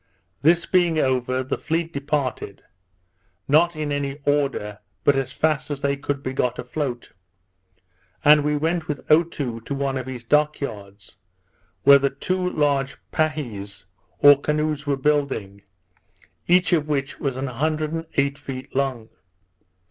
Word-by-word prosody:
This 170 Hz, +3 st, +4 dB
being 175 Hz, -3 st, +2 dB
over, 130 Hz, -2 st, +1 dB
the 130 Hz, -, -3 dB
fleet 165 Hz, +1 st, -2 dB
departed; 140 Hz, -7 st, -3 dB, 0.8 s
not 165 Hz, +4 st, +4 dB
in 155 Hz, -1 st, -3 dB
any 140 Hz, -1 st, -2 dB
order, 135 Hz, -8 st, 0 dB, 0.2 s
but 145 Hz, -, +4 dB
as 135 Hz, -1 st, -1 dB
fast 155 Hz, 0 st, 0 dB
as 145 Hz, -1 st, -4 dB
they 140 Hz, 0 st, +1 dB
could 140 Hz, 0 st, -4 dB
be 130 Hz, -, -3 dB
got 125 Hz, -2 st, 0 dB
afloat; 125 Hz, -1 st, -4 dB, 1.1 s
and 150 Hz, 0 st, +7 dB
we 150 Hz, 0 st, +1 dB
went 160 Hz, +2 st, -1 dB
with 145 Hz, -3 st, -4 dB
Otoo 150 Hz, -7 st, +1 dB
to 140 Hz, -, -4 dB
one 135 Hz, -1 st, -1 dB
of 130 Hz, -, -7 dB
his 125 Hz, -2 st, -6 dB
dock 150 Hz, +4 st, +2 dB
yards, 100 Hz, -6 st, -8 dB, 0.7 s
where 140 Hz, 0 st, +8 dB
the 140 Hz, 0 st, +1 dB
two 180 Hz, +6 st, -2 dB
large 140 Hz, -4 st, 0 dB, 0.2 s
pahies 120 Hz, -, -3 dB, 0.3 s
or 145 Hz, -1 st, +7 dB
canoes 150 Hz, -1 st, -1 dB
were 140 Hz, -1 st, +1 dB
building, 135 Hz, -9 st, -1 dB, 0.9 s
each 180 Hz, +1 st, +4 dB
of 155 Hz, -3 st, +2 dB
which 140 Hz, -2 st, -2 dB
was 135 Hz, -3 st, -2 dB
an 130 Hz, +1 st, -3 dB
hundred 155 Hz, +4 st, -1 dB
and 165 Hz, 0 st, -4 dB
eight 140 Hz, 0 st, +1 dB
feet 130 Hz, -2 st, -8 dB
long. 130 Hz, -5 st, -1 dB
140 Hz, 150 wpm, -23 LUFS, 130-150 Hz, 1.1 s, where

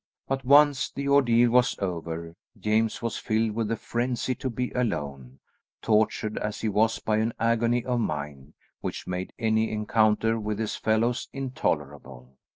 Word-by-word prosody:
But 135 Hz, 0 st, -2 dB
once 145 Hz, +1 st, +5 dB
the 140 Hz, 0 st, -5 dB
ordeal 120 Hz, -4 st, +4 dB
was 125 Hz, +1 st, +3 dB
over, 85 Hz, -3 st, -4 dB, 0.2 s
James 110 Hz, +3 st, 0 dB
was 115 Hz, -, -2 dB
filled 110 Hz, 0 st, 0 dB
with 110 Hz, 0 st, -2 dB
a -, -, +1 dB
frenzy 120 Hz, +2 st, -2 dB
to 130 Hz, +2 st, -4 dB
be 125 Hz, +1 st, -3 dB
alone, 70 Hz, -, -3 dB, 0.4 s
tortured 110 Hz, 0 st, +1 dB
as 105 Hz, 0 st, -4 dB
he 110 Hz, -, 0 dB
was 110 Hz, +2 st, +2 dB
by 110 Hz, -1 st, 0 dB
an 110 Hz, +1 st, 0 dB
agony 115 Hz, +1 st, +1 dB
of 125 Hz, -1 st, 0 dB
mind 75 Hz, -, -4 dB, 0.2 s
which -, -, -5 dB
made 90 Hz, 0 st, -4 dB
any 110 Hz, -1 st, +1 dB
encounter 110 Hz, +1 st, +2 dB
with 105 Hz, -1 st, -3 dB
his 110 Hz, -1 st, -2 dB
fellows 115 Hz, +3 st, 0 dB
intolerable. 75 Hz, -, -4 dB
110 Hz, 155 wpm, -26 LUFS, 100-120 Hz, 0.4 s, once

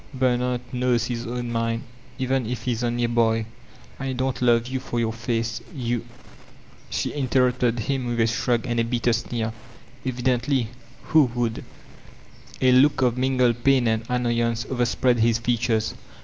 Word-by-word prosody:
"Bernard 125 Hz, -1 st, +1 dB
knows 125 Hz, -2 st, +1 dB
his 120 Hz, -1 st, -4 dB
own 120 Hz, 0 st, -3 dB
mind, 115 Hz, 0 st, -1 dB, 0.3 s
even 130 Hz, -2 st, 0 dB
if 120 Hz, -1 st, -4 dB
he 125 Hz, -, 0 dB
is 120 Hz, 0 st, -2 dB
'only 120 Hz, 0 st, 0 dB
a -, -, +3 dB
boy.' 115 Hz, -1 st, +2 dB, 0.5 s
I 135 Hz, -1 st, -2 dB
don't 130 Hz, 0 st, -2 dB
love 120 Hz, -1 st, +4 dB
you 130 Hz, +1 st, -3 dB
for 120 Hz, -1 st, -3 dB
your 115 Hz, -1 st, 0 dB
face, 115 Hz, 0 st, -2 dB
you 120 Hz, -3 st, -2 dB, 0.3 s
— -, -, -23 dB
" -, -, -25 dB
She -, -, -2 dB
i 145 Hz, -, -3 dB
nterrupte 125 Hz, -2 st, +2 dB
d 115 Hz, -, -3 dB
him 135 Hz, 0 st, -1 dB
with 120 Hz, -1 st, -2 dB
a 115 Hz, -, +5 dB
shrug 115 Hz, +1 st, 0 dB
and 120 Hz, -2 st, -1 dB
a -, -, +3 dB
bitter 120 Hz, 0 st, +1 dB
sneer. 115 Hz, -1 st, -2 dB, 0.5 s
"Evkkntly! 125 Hz, -1 st, 0 dB, 0.3 s
Who 155 Hz, -2 st, +5 dB
would 115 Hz, -2 st, -1 dB
r -, -, -10 dB, 1.0 s
A 130 Hz, -, +6 dB
look 130 Hz, +2 st, +5 dB
of 120 Hz, -2 st, +2 dB
mingled 125 Hz, -2 st, +1 dB
pain 135 Hz, -2 st, +4 dB
and 110 Hz, 0 st, +1 dB
annoyance 120 Hz, -2 st, 0 dB
overspread 125 Hz, 0 st, +1 dB
his 115 Hz, 0 st, +3 dB
features. 115 Hz, -2 st, 0 dB
120 Hz, 175 wpm, -24 LUFS, 115-125 Hz, 1.0 s, A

